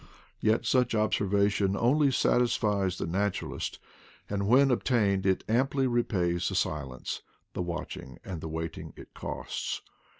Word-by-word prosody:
Yet 110 Hz, +2 st, +2 dB
such 125 Hz, 0 st, +2 dB
observation 100 Hz, -2 st, +2 dB
only 140 Hz, +6 st, +4 dB
satisfies 105 Hz, -7 st, +2 dB
the -, -, -2 dB
naturalist, 100 Hz, +4 st, -2 dB, 0.5 s
and 100 Hz, -1 st, -1 dB
when 135 Hz, +4 st, +5 dB
obtained 105 Hz, -6 st, +2 dB
it 95 Hz, -, +2 dB
amply 135 Hz, +4 st, +2 dB
repays 90 Hz, -8 st, +1 dB
the 95 Hz, -, -4 dB
silence, 70 Hz, -8 st, -2 dB, 0.3 s
the -, -, -3 dB
watching, 85 Hz, -6 st, -5 dB
and 90 Hz, -5 st, -5 dB
the 80 Hz, -, -5 dB
waiting 80 Hz, +1 st, -5 dB
it -, -, -12 dB
costs. -, -, -4 dB
100 Hz, 130 wpm, -29 LUFS, 90-120 Hz, 0.5 s, when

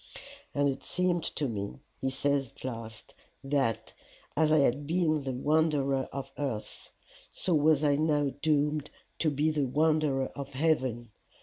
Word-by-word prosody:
"'And 145 Hz, 0 st, +3 dB
it 135 Hz, -1 st, -2 dB
seemed 180 Hz, -1 st, 0 dB
to 145 Hz, -, 0 dB
me,' 100 Hz, -, -4 dB, 0.2 s
he 135 Hz, -, 0 dB
says 135 Hz, -1 st, 0 dB
at -, -, -15 dB
last, 115 Hz, -3 st, -7 dB, 0.3 s
'that, 135 Hz, -5 st, 0 dB, 0.4 s
as 155 Hz, +1 st, +3 dB
I 155 Hz, -, +6 dB
had 140 Hz, 0 st, +2 dB
been 160 Hz, -2 st, +2 dB
the 135 Hz, -1 st, -3 dB
wanderer 140 Hz, 0 st, +1 dB
of 135 Hz, 0 st, -6 dB
earth, 130 Hz, -7 st, -4 dB, 0.4 s
so 180 Hz, -, -1 dB
was 155 Hz, -1 st, +4 dB
I 145 Hz, -1 st, +3 dB
now 150 Hz, -2 st, +2 dB
doomed 150 Hz, -1 st, +1 dB, 0.3 s
to 160 Hz, -, +3 dB
be 150 Hz, +2 st, +1 dB
the 150 Hz, -2 st, +1 dB
wanderer 150 Hz, -1 st, +2 dB
of 140 Hz, -1 st, -7 dB
heaven. 130 Hz, -6 st, 0 dB
145 Hz, 150 wpm, -30 LUFS, 135-155 Hz, 0.4 s, I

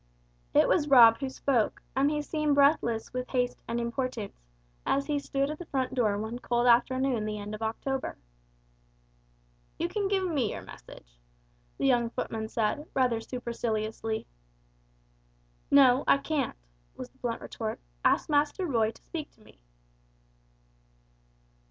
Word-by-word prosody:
It -, -, +6 dB
was 295 Hz, -5 st, +2 dB
Rob 235 Hz, -5 st, +8 dB
who 270 Hz, -1 st, -2 dB
spoke, 260 Hz, -4 st, 0 dB, 0.2 s
and 275 Hz, +2 st, +3 dB
he 300 Hz, 0 st, -1 dB
seemed 305 Hz, -1 st, 0 dB
breathless 280 Hz, -6 st, +2 dB
with 250 Hz, 0 st, -4 dB
haste 245 Hz, -1 st, -1 dB
and 235 Hz, +1 st, -2 dB
importance, 235 Hz, -2 st, -3 dB, 0.5 s
as 275 Hz, 0 st, +1 dB
he 290 Hz, -1 st, 0 dB
stood 275 Hz, 0 st, -1 dB
at 305 Hz, -, -7 dB
the 350 Hz, -, -8 dB
front 260 Hz, -2 st, -1 dB
door 220 Hz, -6 st, +1 dB
one 220 Hz, +3 st, -4 dB
cold 240 Hz, -1 st, 0 dB
afternoon 250 Hz, 0 st, +3 dB
the 215 Hz, 0 st, -3 dB
end 205 Hz, 0 st, -6 dB
of 215 Hz, -, -7 dB
October. 260 Hz, +4 st, -3 dB, 1.6 s
"You 340 Hz, -, -1 dB
can 400 Hz, +2 st, -1 dB
give 385 Hz, -1 st, +1 dB
me 280 Hz, -, 0 dB
your -, -, -7 dB
message," -, -, -14 dB, 0.6 s
the -, -, -1 dB
young 240 Hz, -3 st, +3 dB
footman 220 Hz, -1 st, -4 dB
said, 230 Hz, +8 st, -1 dB
rather 245 Hz, -4 st, +2 dB
superciliously. 225 Hz, -2 st, -3 dB, 1.4 s
"No, 270 Hz, -1 st, +6 dB
I -, -, +6 dB
can't," 280 Hz, -2 st, -2 dB, 0.4 s
was -, -, -8 dB
the -, -, -31 dB
blunt -, -, -3 dB
retort; -, -, -5 dB, 0.2 s
"ask -, -, +3 dB
Master 295 Hz, +5 st, +1 dB
Roy 230 Hz, -8 st, +2 dB
to -, -, -13 dB
speak 310 Hz, -3 st, -6 dB
to 225 Hz, -, -26 dB
me." -, -, -20 dB
255 Hz, 145 wpm, -29 LUFS, 225-285 Hz, 1.6 s, Rob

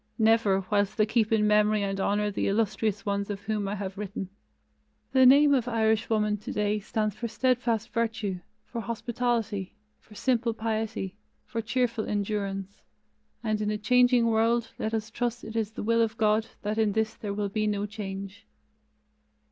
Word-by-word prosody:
Never: 220 Hz, -4 st, +3 dB
whilst 205 Hz, -1 st, +1 dB
they 215 Hz, -, +4 dB
keep 220 Hz, 0 st, +1 dB
in 215 Hz, -1 st, +3 dB
memory 210 Hz, 0 st, +3 dB
and 195 Hz, 0 st, -2 dB
honor 205 Hz, +1 st, +1 dB
the -, -, -1 dB
illustrious 205 Hz, -1 st, 0 dB
ones 200 Hz, 0 st, -1 dB
of 205 Hz, -1 st, -4 dB
whom 205 Hz, 0 st, -2 dB
I 200 Hz, -, -2 dB
have 195 Hz, -1 st, -5 dB
written. 200 Hz, -2 st, -5 dB, 0.8 s
The 260 Hz, -1 st, +6 dB
name 285 Hz, +2 st, +7 dB
of 250 Hz, -3 st, +1 dB
Irishwoman 220 Hz, -2 st, +1 dB
today 210 Hz, 0 st, -1 dB
stands 215 Hz, +1 st, -1 dB
for 235 Hz, -, -4 dB
steadfast 235 Hz, -1 st, 0 dB
virtue, 225 Hz, -5 st, -1 dB, 0.3 s
for 235 Hz, -, -5 dB
hospitality, 230 Hz, -3 st, -2 dB, 0.2 s
for 210 Hz, -, -18 dB
simple 235 Hz, -1 st, +1 dB
piety, 220 Hz, -4 st, -3 dB, 0.3 s
for 230 Hz, -, -3 dB
cheerful 230 Hz, -1 st, 0 dB
endurance, 200 Hz, -1 st, -3 dB, 0.6 s
and 215 Hz, -2 st, 0 dB
in 210 Hz, -, 0 dB
a 210 Hz, -, -1 dB
changing 245 Hz, +2 st, +4 dB
world 230 Hz, +1 st, +2 dB
let 220 Hz, +1 st, -1 dB
us 220 Hz, 0 st, -3 dB
trust 240 Hz, 0 st, -2 dB
it 220 Hz, -, -8 dB
is 220 Hz, -1 st, -1 dB
the -, -, -5 dB
will 230 Hz, +2 st, +3 dB
of 225 Hz, 0 st, 0 dB
God 215 Hz, 0 st, +2 dB, 0.2 s
that 210 Hz, +2 st, -1 dB
in 215 Hz, -2 st, +2 dB
this 220 Hz, 0 st, 0 dB
there 200 Hz, -2 st, -5 dB
will 205 Hz, -1 st, -1 dB
be 215 Hz, +1 st, -1 dB
no 205 Hz, -1 st, 0 dB
change. 200 Hz, +1 st, -7 dB
215 Hz, 170 wpm, -28 LUFS, 205-230 Hz, 0.8 s, name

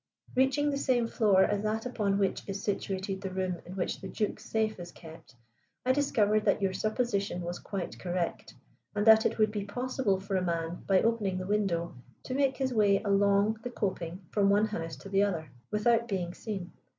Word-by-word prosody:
"Reaching 270 Hz, +3 st, +3 dB
the 280 Hz, -, -1 dB
same 250 Hz, -4 st, +2 dB
floor 205 Hz, -5 st, +4 dB
as 205 Hz, 0 st, +1 dB
that 215 Hz, +2 st, -1 dB
upon 210 Hz, -5 st, 0 dB
which 195 Hz, -1 st, 0 dB
is 195 Hz, 0 st, -4 dB
situated 195 Hz, -1 st, -2 dB
the 195 Hz, -, -3 dB
room 185 Hz, -1 st, -2 dB
in 180 Hz, -, -8 dB
which 185 Hz, -, -2 dB
the 190 Hz, -, -6 dB
Duke's 210 Hz, +2 st, -2 dB
safe 220 Hz, -2 st, -1 dB
is 175 Hz, 0 st, -8 dB
kept, 160 Hz, -6 st, -13 dB, 0.5 s
I 255 Hz, -, +4 dB
discovered 215 Hz, -7 st, +2 dB
that -, -, +3 dB
your 195 Hz, -2 st, 0 dB
supposition 215 Hz, -4 st, -1 dB
was 175 Hz, +1 st, -4 dB
quite 195 Hz, -4 st, -5 dB
correct, 175 Hz, -1 st, -3 dB, 0.4 s
and 205 Hz, 0 st, +1 dB
that 220 Hz, 0 st, +7 dB
it -, -, -5 dB
would 215 Hz, -1 st, +3 dB
be 210 Hz, -2 st, -3 dB
possible 245 Hz, -1 st, -1 dB
for 195 Hz, 0 st, -3 dB
a -, -, +1 dB
man, 170 Hz, -1 st, -2 dB
by 190 Hz, -2 st, +4 dB
opening 215 Hz, -5 st, +1 dB
the 185 Hz, -, -4 dB
window, 190 Hz, -4 st, 0 dB, 0.3 s
to 255 Hz, -, -5 dB
make 270 Hz, -1 st, +1 dB
his 265 Hz, -2 st, -1 dB
way 205 Hz, -3 st, +4 dB
along 200 Hz, +1 st, +3 dB
the 245 Hz, -, -4 dB
coping 185 Hz, -5 st, -3 dB
from 200 Hz, -2 st, +3 dB
one 205 Hz, +2 st, +4 dB
house 165 Hz, -7 st, -4 dB
to 195 Hz, -, -11 dB
the 195 Hz, 0 st, +3 dB
other, 165 Hz, -8 st, -1 dB, 0.2 s
without 230 Hz, +2 st, +2 dB
being 180 Hz, -5 st, -2 dB
seen. 190 Hz, -5 st, -5 dB
200 Hz, 200 wpm, -30 LUFS, 185-220 Hz, 0.5 s, that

